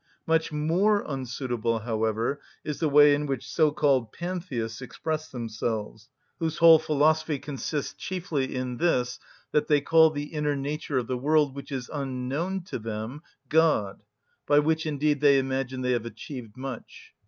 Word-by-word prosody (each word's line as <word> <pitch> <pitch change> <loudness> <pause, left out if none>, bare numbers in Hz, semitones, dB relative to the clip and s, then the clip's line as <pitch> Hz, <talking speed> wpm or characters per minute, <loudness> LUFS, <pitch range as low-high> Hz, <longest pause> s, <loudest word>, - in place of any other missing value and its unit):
Much 160 0 +1
more 175 +8 +2
unsuitable, 125 -4 -2
however, 110 +3 -1 0.2
is 150 - -4
the 160 - +1
way 145 0 +7
in 145 +1 -1
which 135 -3 -3
so‐called 145 -7 +2
pantheists 165 -11 -4
express 155 +5 -4
themselves, 110 -1 -4 0.3
whose 160 -1 -2
whole 165 -1 +8
philosophy 155 0 +2
consists 145 +1 -4
chiefly 160 -8 -3
in 125 -1 -3
this, 125 -7 +1 0.3
that 150 0 +1
they 150 -1 +4
call 160 +2 +5
the 145 0 -6
inner 150 -1 0
nature 140 0 -3
of 125 - 0
the 125 +1 -3
world, 150 0 +2
which 140 +1 -8
is 130 -3 -4
unknown 140 +7 -3
to 175 - -5
them, 110 +5 -5 0.3
"God;" 155 -11 +2 0.5
by 145 - +4
which 160 +2 +2
indeed 150 -1 0
they 140 -2 +6
imagine 130 -1 -2
they 125 0 0
have 120 -2 0
achieved 120 -3 -9
much. 130 -2 -8
140 Hz, 155 wpm, -27 LUFS, 125-155 Hz, 0.5 s, whole